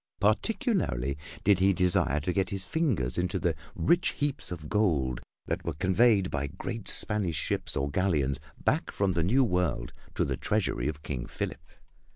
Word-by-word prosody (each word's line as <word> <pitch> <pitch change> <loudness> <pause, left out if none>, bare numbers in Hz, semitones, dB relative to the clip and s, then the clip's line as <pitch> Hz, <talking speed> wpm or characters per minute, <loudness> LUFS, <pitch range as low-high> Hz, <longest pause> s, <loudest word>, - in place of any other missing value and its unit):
Particularly 105 - +1 0.3
did 100 -1 +4
he 95 +1 +4
desire 90 -6 +2
to 90 - -1
get 95 +1 +1
his 95 -2 -3
fingers 100 - 0
into 90 0 0
the - - +1 0.2
rich 175 +2 +2
heaps 145 -1 -1
of 80 -4 -6
gold 75 - +1 0.2
that - - -2
were 85 - -3
conveyed 95 +3 +3
by 70 -1 -1
great 110 +9 -6
Spanish 100 -6 0
ships - - -1
or 70 - 0
galleons 75 -7 +1 0.2
back - - +1
from 100 -1 +1
the 85 - +1
New 120 +11 +3
World 90 - 0 0.2
to - - +2
the - - -2
treasury 95 - 0
of 75 -1 -4
King 65 -6 -4
Philip. - - -4
90 Hz, 170 wpm, -29 LUFS, 75-105 Hz, 0.3 s, did